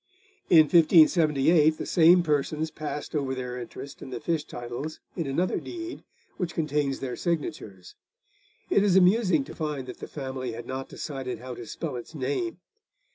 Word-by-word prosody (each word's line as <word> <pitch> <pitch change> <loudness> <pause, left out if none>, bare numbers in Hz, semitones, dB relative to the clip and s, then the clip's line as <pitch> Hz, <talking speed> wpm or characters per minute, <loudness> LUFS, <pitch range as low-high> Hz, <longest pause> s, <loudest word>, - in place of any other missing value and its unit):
In 165 -3 +9
1578 155 -1 +5
the - - -4
same 175 +1 +6
persons 155 +1 0
passed 150 -1 -5
over 135 -3 -1
their 125 -1 -5
interest 135 +3 -9
in - - -8
the 125 -2 -5
fish 165 +1 -1
titles 120 +6 -6 0.2
in 165 -5 -2
another 170 +7 0
deed, 345 -1 -7 0.3
which 175 -3 -3
contains 150 -3 -1
their 130 -2 -3
signatures. 145 - -4 0.8
It 200 - +4
is 195 -3 +3
amusing 185 -4 +4
to 135 - -10
find 150 -5 -3
that 125 - -9
the - - -7
family 130 -4 -5
had 115 +1 -7
not 130 +1 -5
decided 135 -5 -5
how 125 +2 -7
to 120 -1 -9
spell 155 -6 -5
its 120 +7 -9
name. 145 +5 -2
150 Hz, 165 wpm, -27 LUFS, 130-165 Hz, 0.8 s, In